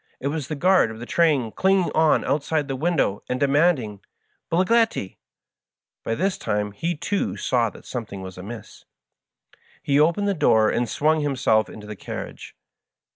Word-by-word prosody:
It 140 - -2
was 150 -2 -3
the 155 - -4
guard 185 -4 +3
of 110 - -8
the 120 - -7
train 145 -7 +2
clinging 190 - +2
on 160 -1 +3
outside 150 +1 0
the 135 - -3
window 145 - 0
and 125 - -1
demanding 140 - +2 0.5
"Bigliettil" 190 - +1 0.9
By 115 - -1
this 190 +6 -1
time 105 0 -2
he, 165 +12 -3
too, 145 - -2
saw 120 +2 +1
that - - -15
something 110 -6 -6
was 95 -1 -8
amiss. 105 +5 -10 1.0
He 140 0 +2
opened 170 +7 +2
the 200 - +2
door 110 - +3
and 120 -1 -1
swung 155 +5 +2
himself 125 -7 +1
into 105 - -10
the 105 0 -7
carriage. - - -8
140 Hz, 160 wpm, -23 LUFS, 110-165 Hz, 1.0 s, guard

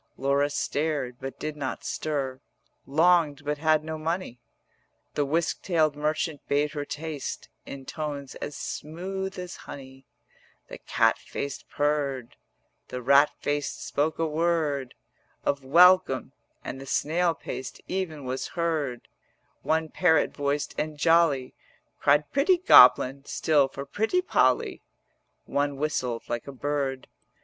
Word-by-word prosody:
Laura 140 +2 +2
stared 145 -4 -2
but 135 0 -6
did 155 0 -4
not 135 -3 -4
stir, 135 -4 -3 0.5
Longed 155 -1 +3
but 150 0 -2
had 155 -1 +3
no 160 0 -5
money: 165 -5 -3 0.7
The 145 - 0
whisk 160 +4 0
tailed 160 -5 +1
merchant 155 +1 -1
bade 145 +1 +1
her 145 -2 -4
taste 150 -1 -5 0.2
In 135 -1 -8
tones 145 -3 -5
as 150 - -6
smooth 190 +5 -5
as 180 -1 -6
honey, 135 -1 -10 0.6
The - - -9
cat - - +2
faced 140 - -6
purr'd, 140 -4 -1 0.5
The 125 - -5
rat 140 +3 +6
faced 145 -1 -2
spoke 150 +2 0
a 165 - +1
word 155 -4 0 0.5
110 - - +2
Of - - -14
welcome, 180 -5 +5 0.3
and 135 - -6
the 135 - -9
snail 170 +4 +1
paced 130 -2 -7
even 175 -6 -3
was 130 +1 -3
heard; 155 -7 -1 0.5
One 160 0 +1
parrot 160 -3 +2
voiced 145 0 -1
and 155 -1 -3
jolly 160 -5 +3 0.5
Cried 145 +1 +4
'Pretty 295 +7 +3
Goblin' 135 - +7
still 145 -4 +2
for 140 +1 -7
'Pretty 220 - 0
Polly;' - - +2 0.6
One 145 0 -1
whistled 130 -5 -2
like 120 +2 -4
a - - -5
bird. 135 -1 -2
145 Hz, 135 wpm, -27 LUFS, 140-160 Hz, 0.7 s, Goblin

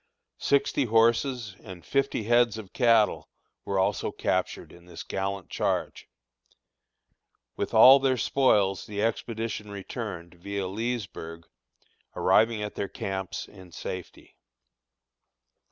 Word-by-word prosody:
Sixty 140 0 +1
horses 115 -1 +2
and 90 -2 -11
fifty 135 -4 0
heads 120 0 +3
of 105 -4 -10
cattle 115 -5 +3 0.4
were 100 - -1
also 95 - 0
captured - - -2
in 85 0 -17
this 90 - -8
gallant 95 -1 -4
charge. - - -2 1.5
With - - -3
all 130 +5 +9
their 130 -1 +1
spoils 105 -9 +2
the 105 0 -3
expedition 115 -1 -3
returned, 100 -3 -6
via 100 +3 -5
Leesburg, 95 -6 -5 0.7
arriving 110 -1 +3
at 105 - -5
their 100 - -3
camps 95 -1 -5
in 95 -3 -15
safety. 90 +1 -8
105 Hz, 110 wpm, -27 LUFS, 95-115 Hz, 1.5 s, all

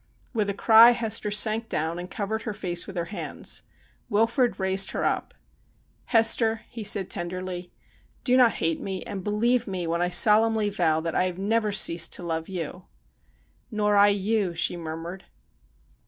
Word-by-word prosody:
With 210 -4 -1
a 200 - -2
cry 225 +3 +7
Hester 225 -3 -2
sank 215 +2 +1
down 160 +3 -2
and 180 +1 -7
covered 215 +3 -4
her 215 -3 -5
face 175 -3 -2
with 195 -2 -8
her 170 - -2
hands. - - -4 0.5
Wilfrid 230 +4 +1
raised 190 0 +2
her - - -2
up. - - -2 0.4
' - - -39 0.3
Hester,' 225 -1 +3
he 230 -2 -7
said 200 -2 +2
tenderly, 180 0 -5 0.3
' - - -36
do 250 - +3
not 245 -5 +5
hate 165 -1 -2
me, 190 -1 -5
and 195 -2 -7
believe 230 +4 0
me 185 -3 -4
when 170 +1 -1
I 175 - +1
solemnly 215 +2 +4
vow 160 -5 +1
that 165 0 -4
I 180 - +1
have 180 -1 -4
never 215 +2 0
ceased 170 -4 +2
to - - -3
love 165 0 -4
you.' 180 0 -6 0.4
' - - -38
Nor 210 -2 0
I 205 0 +6
you,' 200 -2 0
she 175 +1 +1
murmured. 165 +2 -7
200 Hz, 180 wpm, -25 LUFS, 175-220 Hz, 0.5 s, cry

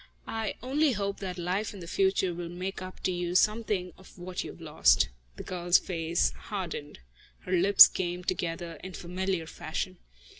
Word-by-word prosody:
I 225 -2 -3
only 280 +2 +2
hope 200 -1 -2
that 185 -2 -5
life 185 +5 -2
in - - -9
the 170 - -8
future 190 0 +1
will 170 0 -5
make 185 +3 -5
up 185 0 -9
to - - 0
you 175 0 -2
something 210 -3 +1
of 190 - -16
what 180 0 -5
you - - -7
have - - -11
lost." 160 -1 +3 0.3
The - - -8
girl's 175 -1 +3
face 170 -1 0
hardened. 175 -7 -6 0.4
Her 180 - -8
lips 185 +2 +9
came 180 -1 -3
together 170 -2 -3
in 185 0 -7
familiar 180 0 -2
fashion. 180 +3 -5
185 Hz, 175 wpm, -29 LUFS, 175-195 Hz, 0.4 s, lips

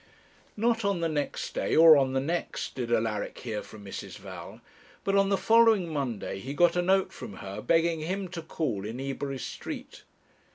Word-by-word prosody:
Not 230 +1 +1
on 200 -3 0
the 165 - +2
next 150 -2 -3
day, - - 0
or 160 -1 +9
on 135 -2 +2
the 135 - +2
next, 165 +6 -3
did 120 -3 -4
Alaric 110 -2 0
hear 110 -4 -4
from 105 -2 -12
Mrs. 95 - -7
Val, - - -9 0.4
but 195 - +1
on 195 0 +4
the 195 - +3
following 225 -6 +4
Monday 125 -9 -3
he 135 +7 -6
got 175 +2 +4
a 175 - +3
note 190 +1 +2
from - - -8
her 95 0 -7
begging 165 +4 +2
him 185 +5 -3
to 170 -1 -6
call 150 -11 -3
in 110 +4 -5
Ebury 135 0 -3
Street. - - -7
155 Hz, 190 wpm, -28 LUFS, 125-185 Hz, 0.4 s, or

